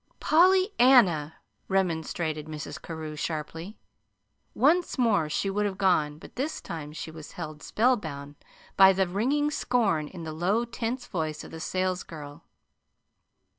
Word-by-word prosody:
"PollyANNA!" 265 Hz, -, +4 dB, 0.3 s
remonstrated 160 Hz, -4 st, -1 dB
Mrs. 155 Hz, -2 st, -7 dB
Carew, 160 Hz, -2 st, -6 dB
sharply. 160 Hz, +5 st, -5 dB, 0.8 s
Once 335 Hz, +6 st, +3 dB
more 210 Hz, -11 st, +2 dB
she 175 Hz, -, -1 dB
would 205 Hz, +1 st, 0 dB
have 190 Hz, -2 st, -5 dB
gone, 160 Hz, -7 st, +2 dB
but -, -, -14 dB
this 295 Hz, +5 st, -3 dB
time 155 Hz, -3 st, -7 dB
she 160 Hz, +1 st, -7 dB
was 155 Hz, -1 st, -11 dB
held 155 Hz, -2 st, -7 dB
spellbound 160 Hz, -, 0 dB, 0.4 s
by 195 Hz, 0 st, +8 dB
the 190 Hz, 0 st, +1 dB
ringing 270 Hz, +11 st, 0 dB
scorn 200 Hz, -, +1 dB
in 175 Hz, +1 st, -9 dB
the 160 Hz, -1 st, -5 dB
low, 195 Hz, +9 st, +1 dB
tense 235 Hz, +2 st, -4 dB
voice 155 Hz, -4 st, -3 dB
of -, -, -11 dB
the 160 Hz, -, -8 dB
salesgirl. 170 Hz, -5 st, -3 dB
180 Hz, 135 wpm, -27 LUFS, 155-230 Hz, 0.8 s, by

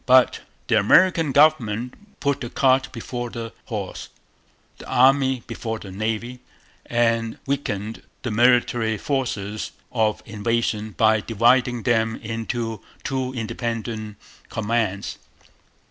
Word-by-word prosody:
But 130 Hz, 0 st, +5 dB, 0.3 s
the 110 Hz, -, +3 dB
American 165 Hz, -, +4 dB
government 125 Hz, -5 st, +3 dB, 0.3 s
put 140 Hz, -2 st, 0 dB
the 120 Hz, -, -4 dB
cart 130 Hz, 0 st, +2 dB
before 120 Hz, 0 st, -5 dB
the 115 Hz, -1 st, -6 dB
horse -, -, -5 dB, 0.7 s
the -, -, -10 dB
Army 130 Hz, -1 st, +4 dB
before 110 Hz, -1 st, -4 dB
the 100 Hz, -3 st, -10 dB
Navy 110 Hz, +5 st, -3 dB, 0.5 s
and 115 Hz, -1 st, +1 dB
weakened 110 Hz, -6 st, -3 dB, 0.2 s
the 120 Hz, -, -2 dB
military 120 Hz, -1 st, +3 dB
forces 110 Hz, -6 st, -2 dB, 0.2 s
of 110 Hz, -3 st, 0 dB
invasion 110 Hz, 0 st, -1 dB
by 110 Hz, -1 st, +4 dB
dividing 120 Hz, +2 st, +2 dB
them 110 Hz, -1 st, +2 dB
into 115 Hz, 0 st, -4 dB, 0.2 s
two 130 Hz, -1 st, -2 dB
independent 110 Hz, -2 st, -4 dB, 0.3 s
commands. 110 Hz, -3 st, -1 dB
115 Hz, 110 wpm, -23 LUFS, 110-125 Hz, 0.7 s, But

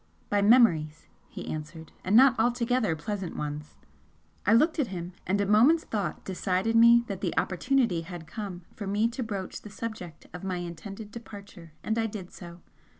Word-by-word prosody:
"By 205 Hz, 0 st, +3 dB
memories," 200 Hz, -9 st, +4 dB, 0.2 s
he -, -, -8 dB
answered 155 Hz, +1 st, -7 dB
"And 190 Hz, +3 st, +1 dB
not 260 Hz, +1 st, +8 dB
altogether 240 Hz, -4 st, +1 dB
pleasant 190 Hz, +3 st, -5 dB
ones!" 150 Hz, 0 st, -5 dB, 0.7 s
I -, -, +6 dB
looked 310 Hz, +8 st, +4 dB
at 275 Hz, -, +2 dB
him, 180 Hz, -2 st, -6 dB
and 195 Hz, +2 st, +1 dB
a 200 Hz, -, +2 dB
moment's 240 Hz, +11 st, +5 dB
thought 200 Hz, -7 st, -3 dB
decided 190 Hz, +3 st, -1 dB
me 235 Hz, +1 st, +7 dB
that 200 Hz, -5 st, -6 dB
the 180 Hz, -, -2 dB
opportunity 230 Hz, -2 st, +1 dB
had 170 Hz, -1 st, -8 dB
come 185 Hz, 0 st, -7 dB
for 200 Hz, -, -6 dB
me 205 Hz, +3 st, +2 dB
to 240 Hz, +2 st, -5 dB
broach 200 Hz, -5 st, -5 dB
the 210 Hz, -, -10 dB
subject 205 Hz, -6 st, -7 dB
of 180 Hz, -, -8 dB
my 185 Hz, -1 st, -2 dB
intended 195 Hz, +5 st, -7 dB
departure, 200 Hz, -7 st, -11 dB
and 220 Hz, +1 st, -1 dB
I 225 Hz, -, +1 dB
did 205 Hz, -4 st, -8 dB
so. 175 Hz, -1 st, -11 dB
200 Hz, 175 wpm, -28 LUFS, 175-230 Hz, 0.7 s, not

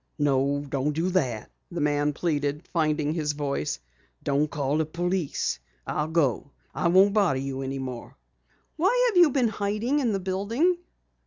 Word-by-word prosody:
"No, 140 Hz, -1 st, +1 dB
don't 140 Hz, +2 st, -1 dB
do 170 Hz, +5 st, 0 dB
that," 125 Hz, -, -1 dB, 0.2 s
the -, -, -5 dB
man 145 Hz, 0 st, +1 dB
pleaded, 145 Hz, -1 st, -1 dB
finding 155 Hz, -2 st, +1 dB
his 150 Hz, -3 st, -1 dB
voice. 140 Hz, -, -2 dB, 0.4 s
"Don't 145 Hz, +2 st, +1 dB
call 145 Hz, 0 st, -1 dB
the 160 Hz, -, +2 dB
police. 175 Hz, -, -1 dB, 0.3 s
I'll 150 Hz, 0 st, -1 dB
go. 150 Hz, -5 st, +1 dB, 0.2 s
I -, -, 0 dB
won't 190 Hz, +3 st, +5 dB
bother 200 Hz, -10 st, +3 dB
you 135 Hz, 0 st, -3 dB
any 135 Hz, 0 st, -3 dB
more." 130 Hz, -3 st, -7 dB, 0.6 s
"Why 470 Hz, +10 st, +3 dB
have 410 Hz, -, -1 dB
you 345 Hz, -3 st, +8 dB
been 255 Hz, -4 st, +2 dB
hiding 215 Hz, +7 st, 0 dB
in 245 Hz, -5 st, +1 dB
the 195 Hz, -, 0 dB
building?" 220 Hz, -, 0 dB
155 Hz, 160 wpm, -26 LUFS, 140-200 Hz, 0.6 s, you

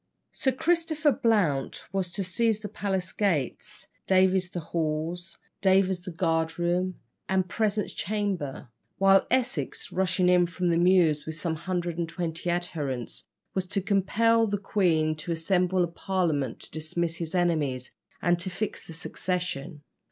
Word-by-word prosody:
Sir 265 Hz, -, +1 dB
Christopher 320 Hz, +1 st, +2 dB
Blount 200 Hz, -, +1 dB
was 190 Hz, -2 st, 0 dB
to 195 Hz, -, -2 dB
seize 220 Hz, +4 st, +1 dB
the 210 Hz, -, -4 dB
palace 190 Hz, -2 st, -2 dB
gates, 170 Hz, -, -1 dB, 0.2 s
Davies 185 Hz, -1 st, +4 dB
the 180 Hz, -, -4 dB
hall, 160 Hz, 0 st, -1 dB, 0.5 s
Davers 190 Hz, -1 st, +3 dB
the 185 Hz, -, -7 dB
guard 165 Hz, -2 st, 0 dB
room 175 Hz, +1 st, 0 dB, 0.3 s
and 190 Hz, -1 st, +2 dB
presence 210 Hz, +1 st, -1 dB
chamber, 190 Hz, -, -2 dB, 0.3 s
while 195 Hz, 0 st, +5 dB
Essex, 245 Hz, -, -1 dB
rushing 185 Hz, 0 st, +1 dB
in 180 Hz, -1 st, +5 dB
from 180 Hz, 0 st, -1 dB
the 165 Hz, -, +3 dB
Mews 170 Hz, -4 st, +4 dB
with 160 Hz, -, -3 dB
some 165 Hz, 0 st, -2 dB
hundred 175 Hz, +1 st, -3 dB
and 165 Hz, -1 st, -1 dB
twenty 170 Hz, 0 st, -3 dB
adherents, 150 Hz, -8 st, -3 dB, 0.3 s
was 185 Hz, -1 st, -1 dB
to 200 Hz, +2 st, -1 dB
compel 220 Hz, +3 st, +3 dB
the 205 Hz, 0 st, 0 dB
queen 170 Hz, -6 st, +1 dB
to 155 Hz, +3 st, -5 dB
assemble 180 Hz, +2 st, +2 dB
a -, -, +1 dB
parliament 170 Hz, -7 st, -1 dB
to -, -, -6 dB
dismiss 165 Hz, +2 st, -2 dB
his 165 Hz, +1 st, -4 dB
enemies, 150 Hz, -8 st, 0 dB, 0.3 s
and 175 Hz, 0 st, +3 dB
to 170 Hz, -, -2 dB
fix 195 Hz, +4 st, -4 dB
the 165 Hz, -, -8 dB
succession. 175 Hz, -3 st, -3 dB
180 Hz, 150 wpm, -27 LUFS, 165-195 Hz, 0.5 s, while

